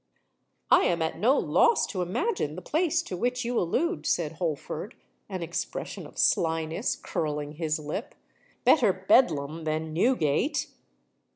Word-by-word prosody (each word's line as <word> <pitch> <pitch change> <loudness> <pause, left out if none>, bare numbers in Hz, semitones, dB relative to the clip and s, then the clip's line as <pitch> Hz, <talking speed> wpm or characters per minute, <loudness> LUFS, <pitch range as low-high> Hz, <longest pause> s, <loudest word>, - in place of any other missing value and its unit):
"I - - +6
am - - +1
at - - -3
no - - +4
loss 470 - +3
to 185 - -4
imagine 180 - -1
the 180 - -8
place 335 - +1
to 185 - -5
which 250 +6 -1
you 240 0 0
allude," 335 - -1
said 160 -4 0
Holford, 165 - -4 0.3
an 185 -3 -4
expression 170 +1 -5
of - - -18
slyness 160 -1 +1
curling 150 -2 -3
his 155 0 -2
lip. 155 - -5 0.5
"Better 240 -10 +5
Bedlam 165 - +2
than 155 0 -2
Newgate." 210 - +1
175 Hz, 135 wpm, -27 LUFS, 155-245 Hz, 0.5 s, I